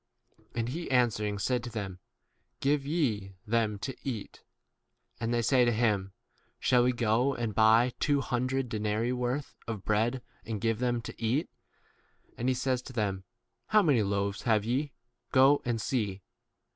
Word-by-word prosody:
And 115 0 -1
he 165 +6 -4
answering 110 -5 +2
said 125 +4 0
to 120 - -5
them, 100 -5 -5 0.6
Give 140 0 +1
ye 110 - -1
them 110 -2 +1
to 135 - -4
eat. 115 -7 -5 0.8
And 115 +1 -1
they 120 -1 +1
say 130 +1 +4
to 120 - +3
him, 105 -4 +1 0.5
Shall 125 -1 +4
we 125 - +3
go 120 +3 +1
and 115 -3 -2
buy 115 +3 +5
two 145 -2 +2
hundred 130 +1 -1
denarii 110 +1 -1
worth 125 +3 -2
of 110 -4 -4
33 - - -37
bread 115 +4 +1 0.2
and 110 -2 -4
give 115 +1 0
them 120 -2 0
to - - -9
eat? 130 +9 0 0.8
And 125 +2 -1
he 130 - +2
says 130 0 0
to 130 - -11
them, 100 -5 -2 0.4
How 215 -1 +5
many 140 -8 +4
loaves 100 0 -1
have 110 -3 +2
ye? 135 +5 0 0.4
Go 135 +2 +5
and 120 -2 0
see. 105 -7 -2
120 Hz, 165 wpm, -30 LUFS, 105-130 Hz, 0.8 s, buy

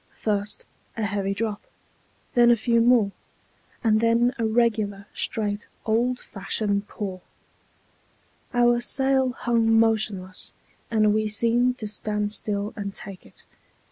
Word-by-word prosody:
First, 205 -1 -2 0.3
a 225 - -1
heavy 200 -1 -1
drop, 210 -1 -2 0.7
then 240 -2 +6
a 240 - +7
few 235 +1 +2
more, 230 -4 +4 0.7
and 215 -1 +3
then 230 +2 +3
a 225 - +1
regular, 215 -3 +1
straight, 205 -2 -2 0.2
old 240 +3 +1
fashioned 200 +1 -2
pour. 190 -3 -5 1.3
Our 240 -1 +3
sail 265 +1 +1
hung 230 -2 +2
motionless, 215 -5 0 0.4
and 215 -2 +3
we 215 0 +1
seemed 235 +4 +2
to 215 - -5
stand 210 0 -2
still 210 0 -2
and 200 -2 -5
take 195 -3 -7
it. - - -15
220 Hz, 125 wpm, -25 LUFS, 205-235 Hz, 1.3 s, a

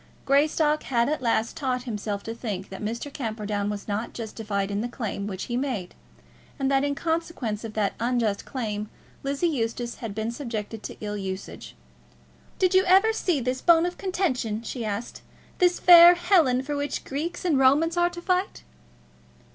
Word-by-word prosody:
Greystock 300 +2 +3
had 235 0 +1
at 305 -2 -1
last 230 -2 0
taught 255 -3 -2
himself 210 -4 -4
to 225 - -5
think 205 -5 -5
that 190 - -8
Mr. 235 +6 -4
Camperdown 215 -5 -3
was 205 -1 -5
not 215 +3 -3
justified 210 -3 -3
in 200 +1 -1
the 240 - -2
claim 215 -5 -4
which 190 -2 -5
he 240 - -4
made, 245 -9 -2 0.6
and 270 -1 0
that 270 0 +3
in 285 0 0
consequence 320 -10 -2
of 220 -2 -7
that 210 -2 +1
unjust 230 -3 0
claim 215 -5 -4 0.3
Lizzie 275 +4 -1
Eustace 240 -4 -2
had 220 -4 -6
been 220 +1 -2
subjected 225 -4 -5
to - - -8
ill 210 -1 -3
usage. 190 -1 -6 0.8
"Did 370 -1 +2
you 375 0 +6
ever 385 +5 +5
see 355 -8 0
this 255 +1 -2
bone 335 -1 +5
of 355 0 -4
contention," 255 - -1
she 235 +1 -5
asked; 215 +2 -4 0.4
"this 360 -1 +3
fair 350 0 +9
Helen 340 -8 +3
for 290 +2 -3
which 285 0 -3
Greeks 320 +7 -4
and 310 -6 +3
Romans 295 +6 +4
are 345 0 +3
to 350 0 -9
fight?" 365 +1 -1
250 Hz, 175 wpm, -26 LUFS, 215-310 Hz, 0.8 s, fair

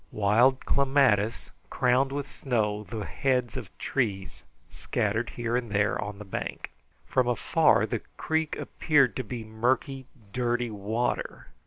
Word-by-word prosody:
Wild 115 +6 +3
clematis 135 -6 +2 0.2
crowned 130 +2 +2
with 145 0 -3
snow 105 -5 -1
the 105 +2 -5
heads 125 -4 0
of - - -6
trees 100 -8 -2 0.2
scattered 115 +3 -2
here 120 0 -2
and 120 -2 -1
there 100 0 +1
on 105 0 -6
the 105 - -9
bank. 95 - -5 0.3
From 130 -1 +1
afar 120 -2 +3
the - - -3 0.2
creek 160 -1 -1
appeared 140 -5 +2
to 130 - -2
be 120 0 -6
murky, 125 +4 -1 0.3
dirty 120 -1 0
water. 110 +4 -3
120 Hz, 135 wpm, -27 LUFS, 105-130 Hz, 0.3 s, Wild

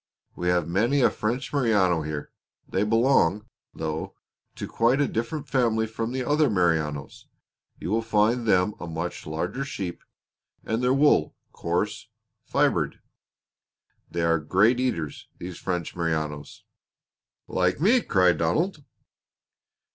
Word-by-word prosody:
We 90 - -3
have 90 -1 +2
many 115 +11 +2
a - - +5
French 125 +7 -3
Merino 105 - +3
here; 75 -1 -5 0.4
they 95 - -1
belong, 105 -4 +3 0.3
though, 80 0 -4 0.4
to - - -5
quite 120 +4 +2
a 145 - +3
different 140 +6 -3
family 115 -4 +2
from 115 +1 -4
the 130 0 -2
other 150 +2 +2
Merinos. 80 -7 -1 0.5
You 90 - -5
will 115 +1 +2
find 115 +2 +1
them 95 +1 +3
a 85 - -6
much 85 +1 -5
larger 85 - -3
sheep, 100 -11 -5 0.6
and 110 +2 -1
their 125 0 +2
wool 135 - +3 0.2
coarse 100 +7 -2 0.4
fibered. - - +1 1.1
They 85 - -2
are 85 -1 +3
great 105 +10 +3
eaters, 85 - -2
these 90 0 -7
French 90 -3 -3
Merinos." 80 -4 -3 0.8
"Like 90 +3 +1
me!" 230 - +4
cried 90 - +3
Donald. 150 - 0
105 Hz, 130 wpm, -26 LUFS, 85-125 Hz, 1.1 s, a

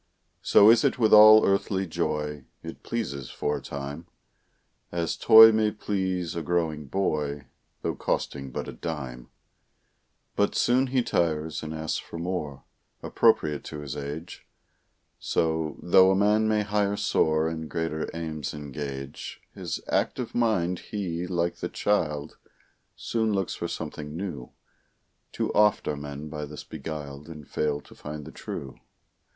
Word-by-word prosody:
So 105 +2 +7
is 115 -1 +4
it - - +2
with 110 -3 +3
all 110 0 +9
earthly 95 0 +1
joy 75 -4 -3 0.2
It - - -8
pleases 70 - -4
for 75 - -2
a - - -8
time, 70 +4 -7 0.8
As 85 -1 -1
toy 110 0 +9
may 110 -1 +2
please 95 -5 -2
a 85 - -2
growing 80 -4 -1
boy, 75 -5 -1 0.4
Though - - 0
costing 70 -1 -2
but - - -5
a - - -5
dime; 65 -7 -6 1.1
But 100 - +1
soon 130 +2 +3
he 130 -1 +1
tires 80 -5 0
and 80 - -6
asks 80 0 -2
for - - -9
more, 85 -5 -4 0.4
Appropriate 75 -1 +2
to 75 - -7
his 70 -1 -6
age; 75 +4 -7 0.7
So, 80 -1 -1
though 95 +2 +6
a 95 - +3
man 105 +2 +3
may 105 -1 +2
higher 105 -1 0
soar 80 -3 +2
And 80 -1 -5
greater 80 -2 -2
aims 80 -3 -5
engage 70 -1 -6
His - - -5
active 125 -3 -1
mind, 95 -7 +1
he, 90 -4 -4
like 85 -1 -1
the - - -4
child, 75 -7 -1 0.6
Soon 110 -2 -1
looks 95 -2 -1
for - - -4
something 75 +1 -6
new. 85 -10 -6 0.8
Too - - -2
oft 105 0 +3
are 75 - 0
men 70 +1 -7
by 75 -1 -5
this 75 +1 -9
beguiled 75 -2 -7
And 75 -4 -10
fail 75 -1 -1
to - - -17
find 75 0 -8
the - - -9
true. 65 -3 -7
80 Hz, 145 wpm, -26 LUFS, 75-100 Hz, 1.1 s, all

